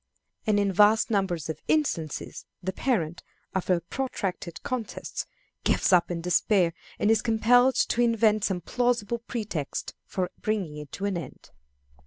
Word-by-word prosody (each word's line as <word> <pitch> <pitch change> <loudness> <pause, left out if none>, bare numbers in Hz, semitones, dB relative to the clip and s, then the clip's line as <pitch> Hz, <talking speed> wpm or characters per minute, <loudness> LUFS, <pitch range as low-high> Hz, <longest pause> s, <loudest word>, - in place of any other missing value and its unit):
And 210 -1 +4
in 200 -1 +1
vast 210 +4 +5
numbers 190 -7 0
of 160 -1 -5
instances, 170 - -1 0.2
the 190 +1 -2
parent, 175 -10 -1 0.3
after 185 -1 +2
a 170 - -2
protracted 185 -5 -4
contest, 250 -4 -4 0.4
gives - - +2
up 175 -1 +5
in 170 -1 -3
despair, 180 0 +2 0.2
and 210 - +3
is 220 -1 +3
compelled 245 +3 +4
to 240 - +2
invent 220 -3 +3
some 185 -3 -1
plausible 235 +1 0
pretext 215 - -4
for 185 -2 -2
bringing 195 -8 -2
it 150 -1 -9
to 200 - -3
an 200 -3 0
end. 150 - -11
200 Hz, 150 wpm, -27 LUFS, 175-230 Hz, 0.4 s, vast